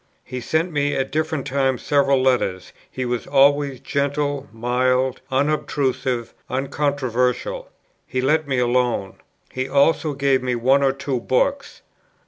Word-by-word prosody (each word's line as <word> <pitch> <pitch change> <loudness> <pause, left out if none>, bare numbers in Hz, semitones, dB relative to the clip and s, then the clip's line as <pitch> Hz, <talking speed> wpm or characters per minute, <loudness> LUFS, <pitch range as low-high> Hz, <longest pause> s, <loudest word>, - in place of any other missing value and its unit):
He 125 0 -6
sent 160 +8 0
me 145 -1 0
at 135 0 -2
different 155 -2 -1
times 135 -2 0
several 140 -2 +3
letters; 100 - 0 0.2
he 130 - -4
was 120 -1 -3
always 140 -1 +3
gentle, 140 0 -1
mild, 125 +3 0
unobtrusive, 135 -3 -1 0.2
uncontroversial. 140 - -1 0.4
He 130 - -2
let 150 +4 +1
me 135 -2 0
alone. 120 -5 0 0.3
He 130 +1 -3
also 150 +2 +2
gave 135 -1 +1
me 125 -1 -1
one 130 +4 +3
or 135 -1 +3
two 135 -1 -3
books. 275 - -1
135 Hz, 130 wpm, -21 LUFS, 125-145 Hz, 0.4 s, several